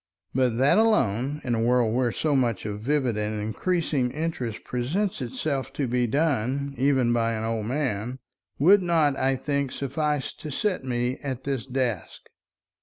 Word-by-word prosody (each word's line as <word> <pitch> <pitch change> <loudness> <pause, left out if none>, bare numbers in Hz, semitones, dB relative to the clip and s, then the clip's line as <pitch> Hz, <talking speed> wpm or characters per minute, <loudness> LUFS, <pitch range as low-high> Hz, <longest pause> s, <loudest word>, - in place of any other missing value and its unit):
But 125 -3 +2
that 135 - +4
alone, 145 - +2
in 120 - -1
a 115 - +1
world 120 -1 +3
where 125 -1 +1
so 150 +3 0
much 120 -7 +1
of 105 -1 -4
vivid 130 -1 0
and 105 0 -2
increasing 135 - 0
interest 130 -6 -3
presents 150 +10 -1
itself 130 +2 -2
to 140 - -1
be 125 0 +1
done, 140 0 0
even 130 -3 +2
by 115 -1 +1
an 110 0 -3
old 110 -1 -2
man, 125 -3 -2 0.4
would 190 +8 +6
not, 165 -5 +2
I 135 0 +1
think, 140 0 -1
suffice 145 +1 -2
to 155 - -8
set 185 +5 -1
me 125 0 -1
at 130 -3 -4
this 135 -3 -3
desk. 125 -7 -2
130 Hz, 165 wpm, -26 LUFS, 120-145 Hz, 0.4 s, would